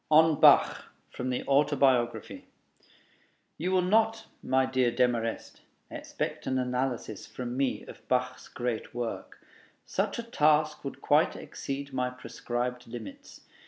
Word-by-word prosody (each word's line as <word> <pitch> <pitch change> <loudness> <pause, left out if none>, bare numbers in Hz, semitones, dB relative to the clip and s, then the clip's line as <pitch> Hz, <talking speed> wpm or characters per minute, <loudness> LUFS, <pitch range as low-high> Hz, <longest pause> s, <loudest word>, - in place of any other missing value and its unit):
ON 155 0 +5
BACH - - +6 0.3
From 125 0 -4
the 125 - -2
Autobiography 135 -4 +2 1.1
You 180 +4 -1
will 185 -1 +3
not, 220 +3 +2 0.2
my 130 0 +2
dear 130 -2 +2
Demarest, 120 -1 -1 0.3
expect - - -5
an 130 - 0
analysis 125 -4 -2
from 125 -1 -6
me 135 -1 -1
of - - -13
Bach's 125 0 -1
great 120 -2 -4
work: 120 -2 -5 0.4
such 195 +2 -1
a 235 - -3
task 155 -8 +2
would 140 -1 -7
quite 150 +2 +3
exceed 140 0 -6
my 125 -1 0
prescribed 125 0 -4
limits. 275 - -10
130 Hz, 125 wpm, -29 LUFS, 125-155 Hz, 1.1 s, BACH